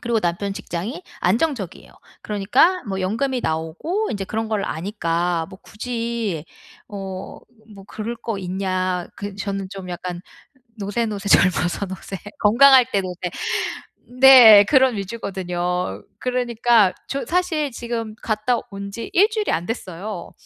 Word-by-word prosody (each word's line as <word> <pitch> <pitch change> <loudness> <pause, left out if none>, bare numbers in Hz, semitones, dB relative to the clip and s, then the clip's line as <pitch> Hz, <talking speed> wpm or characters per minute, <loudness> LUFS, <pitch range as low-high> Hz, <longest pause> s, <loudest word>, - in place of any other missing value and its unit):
그리고 235 -2 0
남편 180 +3 -1
직장이 200 - -5 0.2
안정적이에요. 220 - -1 0.3
그러니까 215 - +2
뭐 190 -1 -3
연금이 240 +7 -1
나오고 165 - -2
인제 200 -2 -3
그런 220 +2 -3
걸 215 -2 -1
아니까 170 -2 -1
뭐 190 - -12
굳이 230 -7 -3 0.4
어 195 -2 -7 0.4
뭐 195 -1 -12
그럴 220 +2 -5
거 225 -1 -4
있냐. 185 -1 -2
그 205 -1 -6
저는 195 -1 -4
좀 195 -2 -8
약간 175 0 -5 0.6
'노세노세 205 0 -2
젊어서 180 +2 +3
노세. 190 +1 -7 0.2
건강할 255 +4 +7
때 200 - +2
노세.' 180 -1 -5 0.9
네. 240 -6 +10
그런 260 0 +4
위주거든요. 180 - -3 0.2
그러니까 240 -5 +2 0.2
저 275 - -3
사실 335 -5 0
지금 235 -2 -5
갔다 215 +3 0
온 200 0 -6
지 230 +3 -7
1 400 +4 +6
주일이 430 -1 -1
안 170 - -1
됐어요. 190 -3 -6
205 Hz, 270 characters per minute, -22 LUFS, 185-235 Hz, 0.9 s, 네